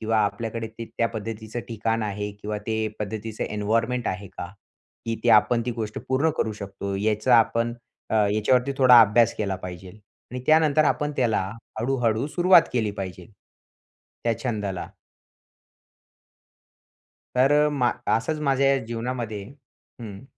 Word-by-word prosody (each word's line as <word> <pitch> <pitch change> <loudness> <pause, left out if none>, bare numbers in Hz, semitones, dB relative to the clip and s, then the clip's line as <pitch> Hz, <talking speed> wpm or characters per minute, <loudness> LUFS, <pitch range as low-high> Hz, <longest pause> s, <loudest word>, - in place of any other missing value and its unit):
किंवा 110 0 +1
आपल्याकडे 115 +2 -3
ते 115 +1 -8
त्या 115 - +2
पद्धतीचं 110 +1 -6
ठिकाण 115 0 -1
आहे 105 0 -3
किंवा 105 +1 -5
ते 110 -1 -1 0.2
पद्धतीचं 110 +1 -4
एन्वायरमेंट 115 +4 -1
आहे 95 +2 -4
का? 90 - -6 0.6
की 115 0 -2
आपण 110 +3 +5
ती - - 0
गोष्ट 110 -3 -4
पूर्ण 135 +5 +2
करू 110 - 0
शकतो. 100 0 -5
याचा 110 +4 +3
आपण 115 +1 +1 0.4
अ, - - 0
ह्याच्यावरती 110 +5 +2
थोडा 125 -3 +8
अभ्यास 115 +2 +4
केला 100 -3 -2
पाहिजेल 90 +2 -9 0.3
आणि 125 +1 -5
त्यानंतर 155 -1 +4
आपण 150 0 0
त्याला, 120 -4 +2 0.4
हळूहळू 120 0 0
सुरुवात 175 +2 +5
केली 115 -4 0
पाहिजे. 95 -2 -7 1.0
त्या 115 - +2
छंदाला. 105 -7 -3 2.5
तर 130 +3 +4 0.2
मा 130 -5 +1 0.3
असंच 150 +7 -3
माझ्या 135 -1 +3
जीवनामध्ये 115 -3 -4 0.6
हं. 105 0 -9
115 Hz, 130 wpm, -24 LUFS, 105-125 Hz, 2.5 s, थोडा